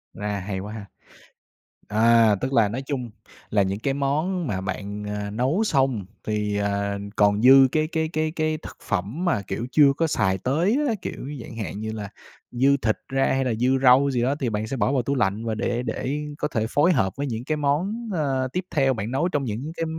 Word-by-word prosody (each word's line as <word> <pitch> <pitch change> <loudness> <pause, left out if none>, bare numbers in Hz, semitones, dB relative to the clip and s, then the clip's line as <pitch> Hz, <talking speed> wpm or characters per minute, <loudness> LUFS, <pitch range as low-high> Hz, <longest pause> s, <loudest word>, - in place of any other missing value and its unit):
A, 105 -1 -3
hay 95 0 -4
quá 105 +3 -7
ha. 105 -3 -7 1.0
À, 110 0 +5
tức 130 +1 -2
là 110 -5 +4
nói 130 +5 -4
chung 125 -4 -3 0.4
là 105 - +2
những 95 +2 -2
cái 135 +4 -1
món 155 +6 -1
mà 95 -5 -2
bạn, 100 +1 -5
à, 105 0 -4
nấu 130 - +1
xong, 135 - +1 0.2
thì, 105 -1 -1
ờ, 100 0 -1 0.2
còn 105 0 +3
dư 135 +1 +8
cái 155 0 +1
cái 160 -1 -1
cái 155 0 0
cái 155 -1 -1
thực - - -11
phẩm 105 - -2
mà, 115 - +1
kiểu, 100 +5 -4
chưa 145 -3 +6
có 165 - +2
xài 95 -10 +1
tới 165 - +1
á. 235 - +1
Kiểu, 135 - -6
chẳng 115 - -10
hạn 105 -2 -4
như 110 0 -3
là 105 -2 -6 0.4
dư 135 +3 +3
thịt 110 -5 0
ra 135 +1 +1
hay 135 0 0
là 125 - 0
dư 130 +3 +2
rau 135 +2 +6
gì 125 -2 0
đó, 135 +3 +1
thì 125 -4 0
bạn 110 0 -2
sẽ 135 - -3
bỏ 130 - +1
vào 130 - +2
tủ 140 +4 -1
lạnh, 110 -2 0
và 110 -1 -1
để 120 +2 -1
để 140 +3 -3 0.2
có 150 - -1
thể 110 -6 -1
phối 155 +7 +3
hợp 95 - +1
với 145 0 -2
những 115 -1 -4
cái 155 +1 -1
món, 185 +11 -1
ơ, 135 -5 0
tiếp 180 0 -2
theo 135 -3 +3
bạn 110 -1 -4
nấu 145 +7 +1
trong 145 -5 -1
những 125 +6 -4
cái 165 - -1
125 Hz, 225 wpm, -24 LUFS, 105-145 Hz, 1.0 s, dư